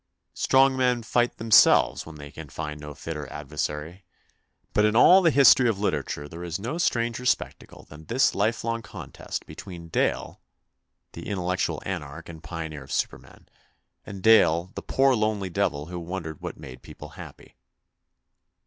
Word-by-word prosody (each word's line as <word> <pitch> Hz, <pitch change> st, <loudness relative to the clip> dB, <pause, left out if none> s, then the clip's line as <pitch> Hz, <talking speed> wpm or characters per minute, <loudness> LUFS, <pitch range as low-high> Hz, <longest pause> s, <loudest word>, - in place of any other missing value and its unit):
Strong 135 Hz, 0 st, +3 dB
men 125 Hz, -2 st, +1 dB
fight 120 Hz, +1 st, 0 dB
themselves 110 Hz, -6 st, +4 dB
when 80 Hz, -, -10 dB
they 75 Hz, -1 st, -10 dB
can 80 Hz, -1 st, -10 dB
find 75 Hz, 0 st, -6 dB
no 75 Hz, -1 st, -9 dB
fitter -, -, -6 dB
adversary; 75 Hz, +4 st, -5 dB, 0.7 s
but 105 Hz, -, +3 dB
in 105 Hz, +1 st, +2 dB
all 180 Hz, +10 st, +7 dB
the 170 Hz, -, +4 dB
history 135 Hz, -4 st, +6 dB
of 110 Hz, -, -1 dB
literature 75 Hz, -7 st, -2 dB
there 85 Hz, +3 st, -9 dB
is 85 Hz, -2 st, -3 dB
no 120 Hz, -, -4 dB
stranger 120 Hz, -6 st, 0 dB
spectacle 125 Hz, -, -2 dB
than 75 Hz, +1 st, -14 dB
this 125 Hz, +8 st, +2 dB
lifelong 115 Hz, +2 st, -1 dB
contest 100 Hz, -, -8 dB
between 85 Hz, -3 st, -10 dB
Dale, -, -, -1 dB, 0.7 s
the -, -, -9 dB
intel 95 Hz, -3 st, -3 dB
lectual 90 Hz, 0 st, -1 dB
anarch 75 Hz, -7 st, -6 dB
and 80 Hz, -2 st, -10 dB
pioneer 80 Hz, -2 st, -6 dB
of 65 Hz, -, -14 dB
supermen, -, -, -4 dB, 0.6 s
and 100 Hz, -2 st, -9 dB
Dale, 90 Hz, -5 st, +4 dB
the -, -, -6 dB
poor 135 Hz, 0 st, +2 dB
lonely 105 Hz, -4 st, -1 dB
devil 80 Hz, -7 st, -1 dB
who 90 Hz, +1 st, -6 dB
wondered 85 Hz, -3 st, -6 dB
what -, -, -6 dB
made 65 Hz, -1 st, -11 dB
people -, -, -11 dB
happy. -, -, -13 dB
95 Hz, 160 wpm, -25 LUFS, 80-115 Hz, 0.7 s, all